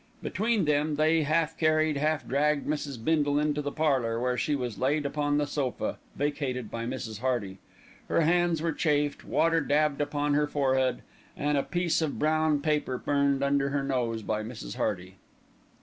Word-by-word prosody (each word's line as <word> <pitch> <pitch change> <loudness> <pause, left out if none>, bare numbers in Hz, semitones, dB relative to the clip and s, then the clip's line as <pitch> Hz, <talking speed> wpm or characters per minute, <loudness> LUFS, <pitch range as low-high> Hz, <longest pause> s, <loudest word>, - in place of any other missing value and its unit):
Between 220 -3 0
them 150 +1 +1
they 155 +2 +3
half 155 +1 +1
carried, 155 -1 +2
half 155 +1 0
dragged 145 +2 +1
Mrs. 145 -3 -2
Bindle 145 -3 +2
into 150 0 +1
the 145 0 -3
parlour, 130 -8 +1
where 125 +1 0
she 145 +5 0
was 125 -5 -4
laid 145 +3 +1
upon 145 0 0
the 150 - +1
sofa, 145 -3 -3 0.2
vacated 135 -5 -2
by 115 0 -4
Mrs. 110 -3 -5
Hearty. 115 -7 -2 0.5
Her - - +2
hands 170 0 +2
were 165 - +1
chafed, 145 -3 0
water 165 0 +2
dabbed 150 0 +1
upon 145 0 0
her 150 +1 +2
forehead, 130 -3 +1 0.3
and 145 +1 0
a 140 - +3
piece 175 +2 0
of 155 -3 -2
brown 155 -1 +2
paper 150 -4 0
burned 140 0 +1
under 140 0 +2
her 140 0 -1
nose 120 -5 -1
by 110 +1 -1
Mrs. 110 - -7
Hearty. 95 -1 -3
145 Hz, 170 wpm, -28 LUFS, 130-155 Hz, 0.5 s, they